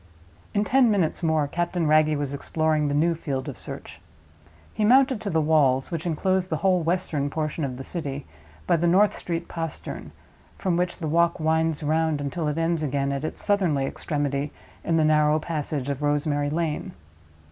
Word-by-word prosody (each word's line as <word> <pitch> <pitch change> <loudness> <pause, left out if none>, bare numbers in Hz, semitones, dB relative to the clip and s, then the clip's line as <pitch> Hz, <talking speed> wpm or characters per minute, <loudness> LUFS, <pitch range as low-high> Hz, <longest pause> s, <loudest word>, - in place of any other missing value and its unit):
In 205 - +3
ten 250 +4 +4
minutes 190 -7 +1
more 160 -3 +1
Captain 175 +2 -1
Wragge 155 0 +4
was 145 -1 -3
exploring 155 +1 0
the 145 - 0
new 165 +3 +3
field 140 -5 -4
of 140 - -5
search. - - -8 0.7
He 215 - -1
mounted 255 +1 +4
to 205 - -3
the 160 -3 +1
walls 145 -2 +2
(which 165 0 -3
inclose 185 +3 0
the 160 - -1
whole 185 +1 +2
western 160 -4 -1
portion 155 +1 -3
of 130 -3 -3
the 135 - -6
city) 140 -3 -4 0.4
by - - +3
the 170 +2 +1
North 195 +4 +4
Street 170 -1 -4
Postern, 165 -2 -6 0.5
from 185 -3 0
which 175 0 -1
the 160 - -4
walk 170 +3 +2
winds 160 0 +1
round 160 0 +1
until 145 +3 -3
it 150 +1 -1
ends 165 0 0
again 140 -1 -1
at 140 +1 -3
its 155 - -4
southernly 180 -10 +2
extremity 145 0 -2 0.3
in 165 - +1
the 160 - +3
narrow 150 0 +4
passage 150 -4 -3
of 140 0 -3
Rosemary 145 0 0
Lane. 160 0 -2
155 Hz, 180 wpm, -25 LUFS, 145-170 Hz, 0.7 s, ten